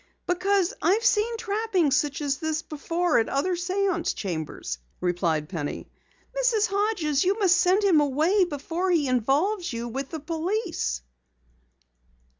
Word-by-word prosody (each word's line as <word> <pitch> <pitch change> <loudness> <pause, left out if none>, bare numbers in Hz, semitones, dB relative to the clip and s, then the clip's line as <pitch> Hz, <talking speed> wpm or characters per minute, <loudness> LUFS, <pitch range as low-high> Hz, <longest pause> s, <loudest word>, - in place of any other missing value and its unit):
"Because 375 +2 +1
I've 435 +6 +2
seen 460 0 +2
trappings 400 -9 +1
such 295 -1 0
as 280 -1 0
these 315 -1 -2
before 330 +2 0
at 225 - 0
other 290 +7 0
séance 365 0 -1
chambers," 160 - -4 0.2
replied 170 -4 0
Penny. 150 -5 -5 0.4
"Mrs. 480 -4 +2
Hodges, 395 -9 +1
you 385 +3 +1
must 380 -4 +4
send 375 +3 +3
him 350 -7 +5
away 310 +8 +2
before 335 +4 -3
he 325 -6 +2
involves 290 - +1
you 235 0 -4
with 270 +3 -4
the 320 - -5
police." 330 - -2
335 Hz, 135 wpm, -26 LUFS, 275-395 Hz, 0.4 s, him